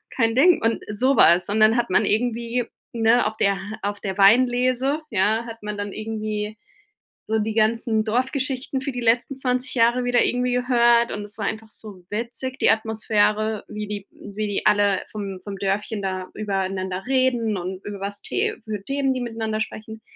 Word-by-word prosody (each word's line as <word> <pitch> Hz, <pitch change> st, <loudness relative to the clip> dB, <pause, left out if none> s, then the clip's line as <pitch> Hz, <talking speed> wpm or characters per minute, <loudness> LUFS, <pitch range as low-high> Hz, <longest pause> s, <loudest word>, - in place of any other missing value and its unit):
kein 225 Hz, -3 st, +2 dB
Ding," 330 Hz, +6 st, +5 dB
und 225 Hz, 0 st, 0 dB
sowas. 205 Hz, -7 st, +4 dB
Und 215 Hz, +2 st, 0 dB
dann 215 Hz, +2 st, +5 dB
hat 240 Hz, -3 st, 0 dB
man 210 Hz, +3 st, +3 dB
irgendwie 235 Hz, +2 st, 0 dB, 0.3 s
ne, 230 Hz, +1 st, +3 dB
auf 215 Hz, 0 st, -5 dB
der 200 Hz, -1 st, +2 dB, 0.3 s
auf 205 Hz, 0 st, -2 dB
der 190 Hz, -2 st, -4 dB
Weinlese, 250 Hz, +6 st, +3 dB
ja, 215 Hz, +3 st, +1 dB
hat 230 Hz, -1 st, -9 dB
man 210 Hz, -1 st, -4 dB
dann 205 Hz, -1 st, -4 dB
irgendwie 215 Hz, -1 st, -4 dB, 0.7 s
so 220 Hz, 0 st, +1 dB
die 215 Hz, +1 st, -1 dB
ganzen 220 Hz, 0 st, +1 dB
Dorfgeschichten 260 Hz, +3 st, -1 dB
für 275 Hz, -, -3 dB
die 245 Hz, -1 st, -5 dB
letzten 240 Hz, +3 st, +1 dB
20 255 Hz, 0 st, -2 dB
Jahre 240 Hz, +1 st, +3 dB
wieder 245 Hz, -1 st, +3 dB
irgendwie 250 Hz, 0 st, 0 dB
gehört. 240 Hz, -1 st, +3 dB
Und 205 Hz, -, -4 dB
es 205 Hz, +1 st, -12 dB
war 205 Hz, -, -3 dB
einfach 220 Hz, +1 st, -4 dB
so 200 Hz, -5 st, -12 dB
witzig, 235 Hz, +4 st, -4 dB
die -, -, +5 dB
Atmosphäre, 215 Hz, -1 st, +1 dB
wie 210 Hz, 0 st, -6 dB
die 205 Hz, -1 st, -6 dB
wie 210 Hz, +1 st, -6 dB
die 205 Hz, -, -3 dB
alle 205 Hz, -2 st, +3 dB
vom 195 Hz, -3 st, -5 dB
vom 200 Hz, -1 st, -6 dB
Dörfchen 200 Hz, +2 st, -2 dB
da 185 Hz, -1 st, -3 dB
übereinander 190 Hz, -2 st, -3 dB
reden 250 Hz, -5 st, +1 dB
und 185 Hz, +1 st, -6 dB
über 205 Hz, -1 st, -6 dB
was 200 Hz, +1 st, -5 dB
te 435 Hz, +2 st, -1 dB
für 210 Hz, -2 st, -5 dB
Themen, 275 Hz, +1 st, 0 dB
die 255 Hz, -, -3 dB
miteinander 225 Hz, -2 st, -3 dB
sprechen. 220 Hz, 0 st, -6 dB
220 Hz, 180 wpm, -23 LUFS, 205-245 Hz, 0.7 s, Ding